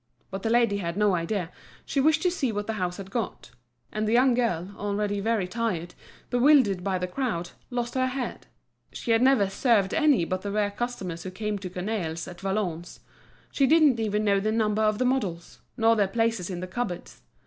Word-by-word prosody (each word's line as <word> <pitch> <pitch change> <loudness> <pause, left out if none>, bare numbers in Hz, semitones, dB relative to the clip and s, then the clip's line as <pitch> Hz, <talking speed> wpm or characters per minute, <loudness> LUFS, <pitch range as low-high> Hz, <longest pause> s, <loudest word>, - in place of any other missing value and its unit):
But 195 0 -4
the 225 - -1
lady 230 -3 +3
had 170 -2 -3
no 210 -2 +3
idea, 175 0 -2 0.3
she 275 - 0
wished 315 +2 +3
to 360 - +3
see 280 -9 -1
what 205 -1 -3
the 225 - -2
house 180 -4 -2
had 195 -1 -9
got. 220 - -4 0.4
And 215 0 -2
the - - +1
young 250 +1 +5
girl, 205 -6 -1
already 205 0 -1
very 215 -2 0
tired, 185 -5 -2 0.4
bewildered 245 -7 +4
by 190 -1 0
the 180 - -2
crowd, 180 -4 -3 0.2
lost 240 -1 -3
her 255 -1 +1
head; 255 -1 -4 0.4
she 235 - -3
had 225 0 +4
never 255 -6 +4
served 200 -1 +2
any 295 - +3
but 185 +2 -2
the 200 - -4
rare 205 0 0
customers 200 -7 -4
who 185 - -5
came 210 +2 -3
to 185 -1 -6
Cornaille's, 180 -3 -3
at 180 0 -10
Valognes; 190 -4 -3 0.5
she 275 - +2
didn't 300 -5 +5
even 210 -1 0
know 200 -1 +3
the 215 +2 0
number 215 -1 +1
of 215 -1 +2
the 255 - +1
models, 205 -10 -2 0.2
nor 225 -1 +4
their 205 -3 +2
places 225 -2 0
in 180 -2 -4
the 185 - -4
cupboards. 185 -3 -5
210 Hz, 205 wpm, -26 LUFS, 185-240 Hz, 0.5 s, young